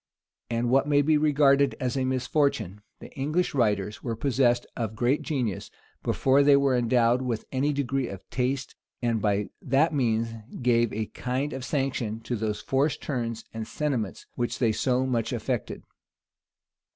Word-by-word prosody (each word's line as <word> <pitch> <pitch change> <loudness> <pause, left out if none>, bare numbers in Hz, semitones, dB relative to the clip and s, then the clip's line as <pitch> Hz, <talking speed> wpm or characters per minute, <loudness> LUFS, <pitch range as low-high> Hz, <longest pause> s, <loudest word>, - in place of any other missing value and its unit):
And, 120 +1 0
what 135 +2 +3
may 145 -1 +4
be 155 +2 +3
regarded 140 -2 +4
as 125 0 -1
a 130 -1 0
misfortune, 130 - 0 0.2
the - - -11
English 155 +6 0
writers 105 -5 0
were 115 -2 -3
possessed 120 0 +2
of 110 -2 -3
great 125 +6 +1
genius 125 - -2 0.3
before 135 +1 +3
they 140 0 +6
were 140 -2 +3
endowed 120 0 +3
with 120 -4 -3
any 140 +3 +1
degree 135 -2 -1
of 100 -3 -9
taste, 130 +1 -2 0.3
and 115 -2 +1
by 105 -1 0
that 140 +5 +2
means 115 -4 +1 0.3
gave 120 -2 +3
a 110 +1 -2
kind 130 +7 -3
of 130 - -5
sanction 130 -6 -2
to 120 +2 -3
those 105 -1 -2
forced 140 +2 0
turns 115 -5 -3
and 110 -1 -5
sentiments 130 -10 -2
which 120 -1 -2
they 115 -3 +2
so 130 +3 +1
much 115 -3 -1
affected. 120 0 -3
125 Hz, 160 wpm, -27 LUFS, 115-140 Hz, 0.3 s, they